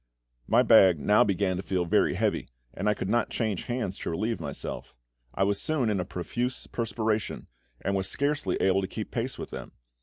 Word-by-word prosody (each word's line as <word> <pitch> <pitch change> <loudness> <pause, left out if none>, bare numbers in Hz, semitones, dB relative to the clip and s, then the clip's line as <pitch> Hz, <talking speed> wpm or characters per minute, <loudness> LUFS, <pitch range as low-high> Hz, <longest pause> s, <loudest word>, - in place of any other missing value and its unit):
My - - +5
bag 90 -5 +6
now 105 +7 +5
began 95 -2 0
to - - -2
feel 95 -2 -1
very 85 - +2
heavy, - - 0 0.2
and - - 0
I 105 - +2
could - - -4
not 120 +3 +1
change 110 -6 -2
hands 120 -6 -3
to - - -3
relieve 110 +7 -1
myself. 70 -5 -6 0.4
I 95 - +2
was 100 0 +1
soon 135 -8 +1
in 100 - 0
a 90 - -1
profuse 120 +8 -3
perspiration, 110 -2 -2 0.4
and 100 - -1
was 95 -1 -1
scarcely 145 +1 0
able 95 0 +2
to 95 - -2
keep 105 +2 -6
pace 125 +2 -3
with - - -7
them. - - -7
100 Hz, 200 wpm, -28 LUFS, 95-115 Hz, 0.4 s, bag